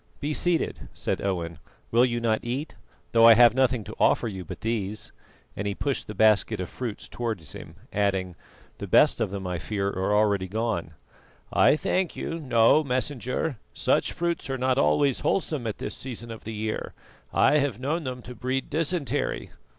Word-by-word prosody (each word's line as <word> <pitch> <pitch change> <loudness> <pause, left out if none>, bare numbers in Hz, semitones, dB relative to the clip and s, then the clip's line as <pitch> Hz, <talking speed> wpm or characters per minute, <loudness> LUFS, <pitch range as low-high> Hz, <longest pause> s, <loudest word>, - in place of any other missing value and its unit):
"Be 150 +1 -2
seated," 175 +1 0
said - - -2
Owen. 85 -5 -2 0.3
"Will 120 +2 +5
you 120 -1 -1
not 110 -2 +1
eat? 130 +6 -4 0.4
though 115 0 +7
I 115 - +9
have 120 -1 +7
nothing 130 -3 +2
to - - -9
offer - - +3
you 95 -4 -5
but - - -9
these," 110 -2 -3 0.4
and 100 - -3
he 100 - -2
pushed 140 +2 -2
the 105 - -7
basket 110 0 +3
of 90 - -4
fruits 120 -5 -5
towards 110 - -4
him, - - -10 0.2
adding, 95 -3 0 0.4
"The 100 - -5
best 130 +7 +4
of 110 - +1
them, 95 0 -5
I 90 -2 -2
fear, 100 +5 -2
are 95 +2 0
already 100 -3 +2
gone." 105 -6 -2 0.6
"I - - +5
thank 180 +3 -1
you, 165 - -4
no, 130 +1 +4
Messenger; 130 +1 -2 0.2
such - - +1
fruits 170 -4 -2
are 135 - -1
not 130 0 +1
always 120 - +3
wholesome 155 -10 -1
at 110 - -3
this - - -4
season 120 -2 -6
of 110 - -9
the 110 - -5
year. 110 +1 -4 0.4
I 150 - +4
have 135 -6 -1
known 155 +6 -1
them 125 -2 -5
to 125 - -8
breed 130 +2 -3
dysentery." 155 -3 -1
115 Hz, 180 wpm, -26 LUFS, 100-135 Hz, 0.6 s, I